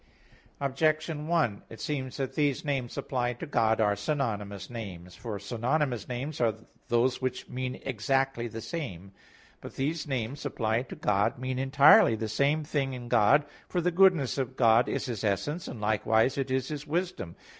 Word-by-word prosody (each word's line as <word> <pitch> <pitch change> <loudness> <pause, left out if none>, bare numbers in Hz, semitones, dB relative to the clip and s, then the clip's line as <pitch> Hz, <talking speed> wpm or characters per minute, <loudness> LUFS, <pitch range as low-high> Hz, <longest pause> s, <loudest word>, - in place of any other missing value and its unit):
Objection 155 +2 0
1: 160 -12 +1
It 115 - -11
seems 130 -4 -3
that 135 -2 -3
these 145 -2 0
names 135 -4 -2
applied 125 -3 -2
to - - -4
God 115 -6 +2
are 105 -2 +3
synonymous 105 -5 -2
names. 95 -7 -8
For 115 -5 -6
synonymous 120 +3 -1
names 130 +4 -4
are 115 -3 +2 0.3
those 125 +2 +2
which 130 -1 -3
mean 130 0 -4
exactly 135 0 0
the 115 0 -7
same. 100 - -6 0.5
But - - -10
these 150 +4 -2
names 130 0 -3
applied 115 +2 -1
to - - -6
God 105 +2 +1
mean 130 +1 -3
entirely 135 -3 +6
the 110 0 -3
same 140 +7 +1
thing 140 -3 -1
in 120 -1 -7
God; 140 +9 +5 0.2
for 180 - 0
the 175 +1 +1
goodness 175 -7 +4
of 130 0 -3
God 115 0 +5
is - - -2
His 120 -6 -4
essence, 145 - -1
and 120 - -7
likewise 110 +3 +2
it 135 -1 -2
is 130 0 0
His 150 0 -5
wisdom. 170 - -2
130 Hz, 170 wpm, -29 LUFS, 110-145 Hz, 0.5 s, entirely